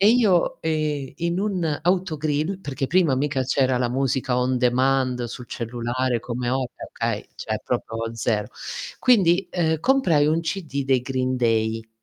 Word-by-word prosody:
e 205 +2 +6
io, 215 -8 +3
ehm, 150 -4 -1
in 170 +2 -1
un 180 -7 -1
autogrill, 160 -1 0
perché 140 -4 -3
prima 165 -4 +3
mica 135 -1 0
c'era 130 -1 +1
la 120 -1 +1
musica 130 -1 0
on 125 0 +1
demand 130 0 +2
sul 120 +1 -7
cellulare 120 +1 -2
come 120 +1 -3
ora, 130 -1 -1 0.2
okay, - - -3
cioè - - -4
proprio 115 0 -2
0. 110 -2 -1 0.5
Quindi, 195 -6 +4
ehm, 160 -3 0
comprai 170 - +3
1 160 +2 +2
CD 160 -5 -3
dei 130 -2 +3
Green 130 0 -1
Day. 115 -2 0
135 Hz, 150 wpm, -23 LUFS, 125-165 Hz, 0.5 s, e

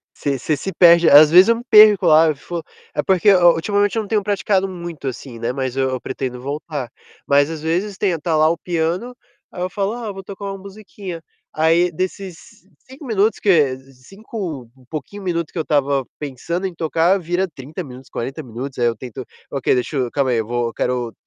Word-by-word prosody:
Você 140 -2 -2
você 150 +2 -1
se 195 - -4
perde. 170 -1 +6
Às 150 +1 +8
vezes 185 +5 +7
eu 230 - +5
me 240 - -8
perco 210 -3 +7
lá, 160 +1 +6
eu 155 - +1
fico 170 +4 -6 0.3
é 150 - 0
porque 190 +2 +4
o 175 -2 +6
ultimamente 205 +5 0
eu - - +2
não 205 - -8
tenho 210 -2 0
praticado 195 -1 0
muito, 170 -6 -7
assim, 125 -2 -7
né, 120 +1 -2
mas 130 -1 -3
eu 135 -1 +1
eu 130 -1 -4
pretendo 125 -1 -5
voltar. 145 -2 -5 0.4
Mas 145 +1 +3
às 160 -2 -6
vezes 185 +5 -2
tem 185 -5 0
tá 160 0 -1
lá 155 +1 +4
o 170 - 0
piano, 175 +8 -2 0.4
aí 180 - -7
eu 180 - -1
falo: 200 +2 -2
"Ah, 235 -3 -5
vou 195 0 -9
tocar 200 +1 -8
uma 195 0 -4
musiquinha". 195 -3 -9 0.3
Aí, 165 +3 +2
desses 185 +1 -4 0.5
5 265 +3 -13
minutos 220 -1 +1
que 150 -10 +3
cinco 140 - -8
um 130 - -21
pouquinho 190 +7 -7
minuto 170 -3 -2
que - - -10
eu 160 - 0
estava 140 -3 +1
pensando 160 +7 -4
em 175 - -9
tocar 165 +4 +1
vira 175 +3 -1
30 155 +3 -8
minutos, 130 -1 -12
40 135 +6 -5
minutos. 125 +3 -7
Aí 120 - +2
eu 115 -1 +1
tento: 125 +2 -8 0.3
"Ok, 135 -3 +1
deixa 125 +4 -2
eu 125 -2 -1
calma 135 -3 0
aí, 120 - +1
eu 110 - -1
vou 120 -1 -2
quero 125 -2 -2
165 Hz, 210 wpm, -20 LUFS, 135-190 Hz, 0.5 s, Às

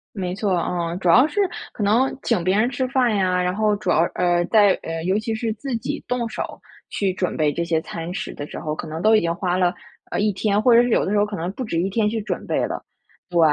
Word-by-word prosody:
没 180 -2 -3
错， 195 -2 0
嗯， 170 0 -2
主 180 - -1
要 250 - +7
是 315 - -6 0.3
可 215 - -6
能 235 +6 +2
请 225 -8 +1
别 185 +3 +2
人 230 +3 +3
吃 260 0 -1
饭 250 -4 +2
呀， 185 -2 +1
然 180 +1 0
后 210 -1 +2
主 200 -3 -2
要 160 - +3
呃， 175 -1 +2
在 205 -3 +5
呃， 165 0 -4
尤 190 +3 +1
其 220 +1 -2
是 220 0 -2
自 255 +1 -4
己 230 - -4
动 245 -2 -1
手 - - -6 0.3
去 195 -2 -1
准 180 -1 -2
备 150 -2 +2
这 170 - -2
些 165 -1 0
餐 165 +1 -6
食 - - -5
的 145 - -6
时 - - -8
候， 150 -1 -3
可 - - -6
能 160 +2 -5
都 220 +2 +5
已 215 - +5
经 170 0 0
花 180 -1 -1
了 180 -1 +2 0.4
呃， - - -2
1 210 0 +2
天， 205 +1 +1
或 240 +1 +5
者 235 - +7
是 245 - 0
有 - - +3
的 200 - -2
时 210 - +2
候 205 - +3
可 210 - -5
能 175 +2 -3
不 255 - -5
止 170 -7 -2
1 190 +3 -1
天 210 +1 +1
去 220 +1 -2
准 210 - -4
备 - - 0
了。 - - -5 0.5
对， 175 -2 -1
200 Hz, 285 characters per minute, -22 LUFS, 175-220 Hz, 0.5 s, 要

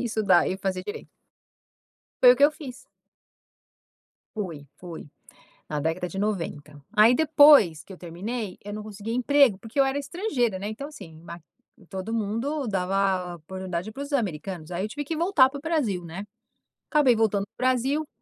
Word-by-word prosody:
e - - -2
estudar 220 -6 +3
e 190 - -2
fazer 190 -1 -3
direito. 205 - -7 1.1
Foi 250 -1 +10
o 250 - -1
que 285 - +5
eu 290 - +6
fiz. 285 -5 -9 1.6
Fui, 165 -9 -5
fui. 170 -3 -9 0.6
Na 150 -1 -3
década 165 +4 -2
de 195 - -6
90. 160 -8 -3 0.2
Aí 220 +4 +6
depois 290 - +6
que - - -15
eu 190 - -10
terminei, 190 +5 -5
eu 205 - -7
não 210 0 -6
conseguia 215 +1 -6
emprego, 260 -4 +4
porque 225 +7 -6
eu - - +7
era 270 +1 -1
estrangeira, 280 - -1
né, 205 - -4
então 275 +7 -6
assim, 165 - -12
ma 170 0 -9 0.5
todo 190 +4 -5
mundo 230 +6 -2
dava 190 -2 0
oportunidade 185 +3 -5
pros 280 +5 -7
americanos, 185 - -3
aí 180 +2 -2
eu 215 - -6
tive 290 +4 -5
que 310 +2 -4
voltar 330 -7 +4
pro 280 0 -7
Brasil, 265 - -1
né? 175 +5 -7 0.7
Acabei 295 -5 +4
voltando 215 -3 +1
pro 255 - -2
Brasil, 270 +5 0
215 Hz, 170 wpm, -25 LUFS, 185-270 Hz, 1.6 s, Foi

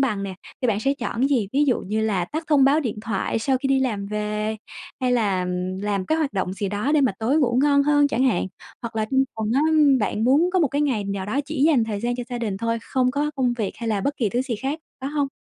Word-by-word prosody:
bằng 215 -7 0
nè, 195 -1 -4 0.3
thì 250 - +2
bạn 210 -2 +1
sẽ 275 +4 +2
chọn 225 - -3
cái 265 - +4
gì? 240 -8 +1
Ví 285 +2 +3
dụ 255 -5 +1
như 215 +3 -2
là 200 -5 0
tắt 315 - -5
thông 290 -4 +4
báo 285 +3 +4
điện 235 -7 -3
thoại 220 0 -1
sau 260 +4 +1
khi 270 - -2
đi 270 0 +2
làm 215 -6 -1
về 210 +1 -2 0.4
hay 255 -1 +1
là, 205 -6 +1
ừm, 180 +1 -3
làm 200 -2 -1
cái 315 - +1
hoạt 300 -6 -1
động 190 -2 -2
gì 195 +1 -3
đó 210 +8 -1
để 305 - +4
mà - - -2
tối 240 +7 +1
ngủ 250 -4 +2
ngon 285 -1 +4
hơn 290 0 +3
chẳng 265 -2 +1
hạn? 225 -9 +1 0.4
Hoặc 235 -1 -6
là 220 - +1
trong 265 0 +3
tuần 220 -1 -2
á, 270 - +3
ưm, 295 -4 +5
bạn 215 0 -1
muốn 295 +8 +4
có 375 - +3
một 320 -5 +3
cái 285 +3 -1
ngày 250 -8 0
nào 200 -1 -3
đó 260 +7 0
chỉ 290 -2 -2
dành 295 -7 +4
thời 210 -2 -4
gian 240 +2 -1
cho 245 - -3
gia 245 -1 -4
đình 215 -5 -2
thôi, 230 +3 -1
không 255 0 +1
có 290 +3 -1
công 250 -2 +1
việc 220 -5 -3
hay 230 - -4
là 210 -3 0
bất 285 +8 -1
kỳ 225 - 0
thứ 245 +5 0
gì 255 -4 -3
khác, 270 +7 -3 0.2
phải 270 +2 -4
hông? 290 -2 0
240 Hz, 290 wpm, -23 LUFS, 210-275 Hz, 0.4 s, ưm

